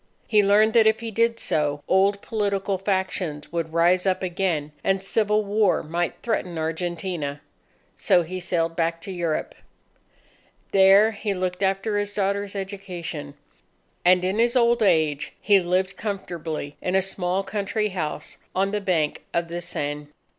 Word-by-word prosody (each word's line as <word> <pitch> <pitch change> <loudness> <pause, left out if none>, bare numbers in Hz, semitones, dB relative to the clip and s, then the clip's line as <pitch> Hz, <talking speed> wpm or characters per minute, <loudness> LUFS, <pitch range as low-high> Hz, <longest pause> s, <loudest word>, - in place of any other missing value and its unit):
He 210 -2 +4
learned 210 +2 +4
that 225 -2 +6
if 220 0 +3
he 230 -1 -5
did 230 +2 +1
so, 145 -1 -1
old 200 +1 +3
political 200 -3 -1
factions 185 -6 -2
would 165 -1 -2
rise 175 +3 +3
up 190 0 +1
again, 175 -5 -1
and 195 0 +1
civil 210 +1 +1
war 205 +1 +2
might 170 +2 -2
threaten 185 -7 -2
Argentina. 165 -2 -3 0.6
So 185 -8 +3
he 185 +3 -5
sailed 170 -2 -1
back 165 0 0
to 195 - -6
Europe. 170 -4 -2 1.2
There 195 +3 +6
he 205 -1 -3
looked 185 0 -3
after 195 +2 0
his 205 0 -3
daughter's 200 0 -1
education. 180 -7 -6 0.7
And 180 0 +4
in 190 +4 0
his 235 +2 +3
old 235 -1 +3
age, 155 -8 +2
he 200 -2 +4
lived 185 +2 0
comfortably 170 -8 -5
in 180 - -1
a 190 - +3
small 190 0 -1
country 210 +1 -2
house 155 -5 -5 0.2
on 195 +1 +1
the 210 0 -1
bank 165 -6 0
of 170 0 0
the 175 +1 -4
Seine. 145 -2 -4
190 Hz, 155 wpm, -24 LUFS, 170-205 Hz, 1.2 s, that